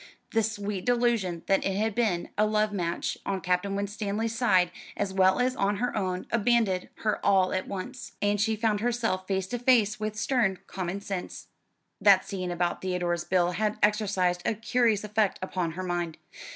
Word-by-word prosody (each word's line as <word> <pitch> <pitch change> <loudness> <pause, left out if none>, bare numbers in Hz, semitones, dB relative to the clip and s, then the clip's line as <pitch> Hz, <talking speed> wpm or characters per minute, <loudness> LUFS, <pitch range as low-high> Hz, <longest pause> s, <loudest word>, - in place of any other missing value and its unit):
The 225 - +3
sweet 205 -3 -3
delusion 235 -8 +1
that 195 - +2
it 195 - -1
had 215 +2 0
been 205 -7 0
a 215 +1 +3
love 215 0 +1
match 175 -3 -2
on 195 -1 -2
Captain 185 +2 0
Winstanley's 205 +2 -2
side, 185 -8 +3 0.3
as 200 -2 -1
well 190 +3 +4
as 255 +1 +1
on 200 -3 +1
her 245 +5 -2
own, 185 -3 -2
abandoned 225 -5 +2
her 215 -2 0
all 190 -2 +3
at 185 - -2
once, 220 +6 -6
and 205 0 +1
she 220 +1 +2
found 215 -1 +1
herself 225 -5 -1
face 190 -1 0
to 245 - -3
face 230 -4 +3
with 215 0 -3
stern 215 -3 +1
common 190 +1 -4
sense. 195 -3 -6 0.5
That 195 -2 +6
scene 185 -2 -3
about 175 0 -1
Theodore's 175 -2 -1
bill 180 -1 +2
had 210 +3 -1
exercised 195 -4 +2
a 220 - 0
curious 225 -1 +1
effect 210 -1 +1
upon 180 -3 -2
her 185 +3 -5
mind. 175 -3 -2
200 Hz, 180 wpm, -28 LUFS, 185-220 Hz, 0.5 s, That